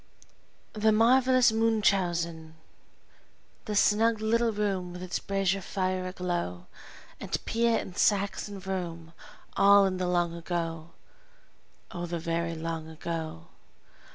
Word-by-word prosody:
The 215 0 +2
Marvelous 250 +2 +4
Munchausen 175 -8 0 1.1
The 210 - -3
snug 220 +2 +3
little 230 +2 +1
room 195 -4 -2
with 180 0 -7
its 180 - -3
brazier 195 -1 0
fire 185 -1 -2
aglow, 175 - -3 0.5
And - - -2
Piet 230 0 +1
and 180 - -10
Sachs 200 -1 +1
and 200 -1 -8
Vroom 175 -3 -5 0.4
all 200 0 +6
in 185 -1 -1
the 185 -1 -1
long 175 -1 +1
ago, 165 -1 -4 1.0
Oh, 175 0 -5
the 170 0 -3
very 165 0 -2
long 165 0 -4
ago! 160 - -6
185 Hz, 120 wpm, -28 LUFS, 170-210 Hz, 1.1 s, all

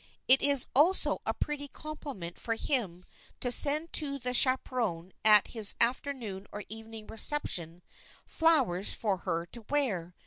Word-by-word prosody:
It 260 +1 +7
is 280 -3 +4
also 335 +8 +2
a - - 0
pretty 290 -1 -5
compliment 280 - -9
for 230 - -3
him 200 -9 -3 0.3
to 245 - -2
send 300 +5 +5
to 280 -3 +3
the 250 -1 -4
chaperon 235 -9 0
at 210 -1 +5
his 220 -3 +1
afternoon 235 -5 -2
or 205 - -8
evening 225 0 -9
reception, 180 - 0 0.4
flowers 265 - 0
for 205 -4 -2
her 170 -2 -4
to 235 - -9
wear. 195 -12 -2
235 Hz, 140 wpm, -28 LUFS, 190-280 Hz, 0.4 s, It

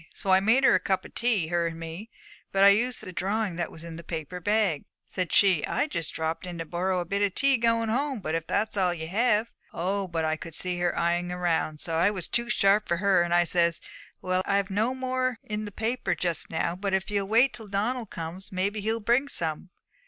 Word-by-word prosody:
So 195 - -1
I 190 - +7
made 225 +7 +3
her - - +6
a - - +4
cup 190 -1 -1
of - - -12
tea, 220 -9 0
her 170 -1 +1
and 165 0 -6
me; 165 +7 -7 0.4
but 195 0 +3
I 200 - +9
used 235 +5 +1
the 185 - -8
drawing 200 0 -1
that 170 -2 -2
was 160 - -10
in 165 -1 -8
the 170 - -9
paper 165 +2 -5
bag. 205 -5 +1 0.2
Said 185 -3 -3
she, 185 -6 +5
"I - - 0
just 165 - -4
dropped 160 +3 -3
in 175 -1 -6
to 165 - -4
borrow 180 +3 -1
a - - -4
bit 200 +3 -1
of 200 -2 +1
tea 275 -1 +4
going 230 -1 +1
home, 270 +2 0
but 160 -5 -4
if 165 0 -2
that's 210 +2 0
all 180 -3 +1
ye 160 -1 -5
have" 215 +4 +1 0.2
Oh, 190 +3 -2
but 165 -2 -2
I 155 0 0
could 165 0 -7
see 180 0 0
her 175 0 0
eyeing 175 +1 +1
round; 170 -4 -1
so 165 -1 -1
I 175 +4 +4
was 190 -5 -3
too 235 0 -1
sharp 205 -2 +3
for 170 - +1
her, 190 -1 +3
and 175 0 -1
I 175 0 +5
says, 170 -1 +1 0.4
"Well, 185 0 +1
I've 200 0 +1
no 220 +6 +1
more 255 -1 -1
in 215 0 -4
the 205 - -7
paper 230 +5 -1
just 170 -3 -3
now, 170 +1 -1
but 195 +1 -1
if 190 +2 -2
ye'll 200 -1 0
wait 235 +5 +4
till 220 -2 -9
Donald 215 +3 -2
comes, 170 +3 -5
maybe 200 +3 -1
he'll 225 +2 -1
bring 240 +6 +2
some." 165 - -3
190 Hz, 240 wpm, -27 LUFS, 170-220 Hz, 0.4 s, I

